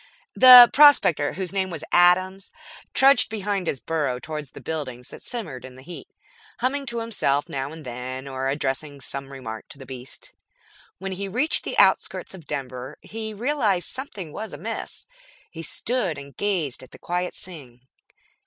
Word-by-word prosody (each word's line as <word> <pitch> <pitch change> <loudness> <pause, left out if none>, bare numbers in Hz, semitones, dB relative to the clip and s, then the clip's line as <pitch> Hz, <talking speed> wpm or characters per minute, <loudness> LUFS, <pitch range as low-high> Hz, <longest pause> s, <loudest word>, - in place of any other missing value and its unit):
The 250 -1 +11
prospector, 275 - +6
whose 190 -1 -4
name 190 -1 0
was 165 -4 -6
Adams, 185 +2 +3 0.4
trudged 270 -2 +5
behind 200 -4 -2
his 135 - -1
burro 145 -1 -1
toward 150 +3 -6
the 135 - -13
buildings 130 -6 -6
that - - -11
shimmered 165 - -5
in 130 -1 -11
the 130 - -14
heat, 175 +4 -10 0.5
humming 275 +3 -1
to 235 -1 -2
himself 145 -11 0
now 135 +1 -4
and 160 -2 -10
then 130 +2 -6
or 135 0 -3
addressing 140 +1 -3
some 135 +1 -6
remark 115 -5 -8
to - - -10
the 135 - -11
beast. 130 0 -10 0.6
When 195 +2 -5
he 195 +1 -4
reached 255 +11 0
the - - -4
outskirts - - +2
of 175 -6 -12
Denver 130 -3 -5
he 220 0 -6
realized 215 -5 0
something 200 - -7
was 220 -4 -6
amiss. 215 +10 -6 0.5
He 165 - -8
stood 190 - -2
and 140 -1 -11
gazed 180 -10 -1
at 130 - -12
the - - -14
quiet 180 +1 -3
scene. 135 -9 -11
165 Hz, 165 wpm, -24 LUFS, 135-205 Hz, 0.6 s, The